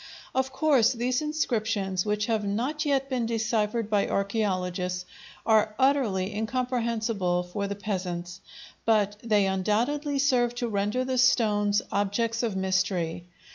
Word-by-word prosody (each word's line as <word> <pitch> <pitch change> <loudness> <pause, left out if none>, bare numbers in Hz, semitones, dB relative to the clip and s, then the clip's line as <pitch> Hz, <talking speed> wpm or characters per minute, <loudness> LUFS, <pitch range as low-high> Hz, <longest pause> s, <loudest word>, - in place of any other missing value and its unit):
Of 265 0 0
course 265 -4 +3
these 250 +2 0
inscriptions, 220 -10 -1
which 210 0 0
have 220 -2 0
not 245 +10 -1
yet 275 -2 +1
been 250 -4 -1
deciphered 225 -1 0
by 205 -2 +1
archæologists, 185 -3 -1 0.4
are 215 -1 +3
utterly 230 -8 +2
incomprehensible 225 -5 -1
for 200 +3 -4
the 200 - -3
peasants, 180 -3 -4 0.4
but 210 -2 +2
they 210 -3 +3
undoubtedly 235 +10 0
serve 250 -3 +2
to 245 0 -2
render 210 +4 -1
the 255 -1 0
stones 210 -5 +3
objects 225 +3 0
of 225 -5 -1
mystery. 185 -3 -1
215 Hz, 130 wpm, -27 LUFS, 195-245 Hz, 0.4 s, course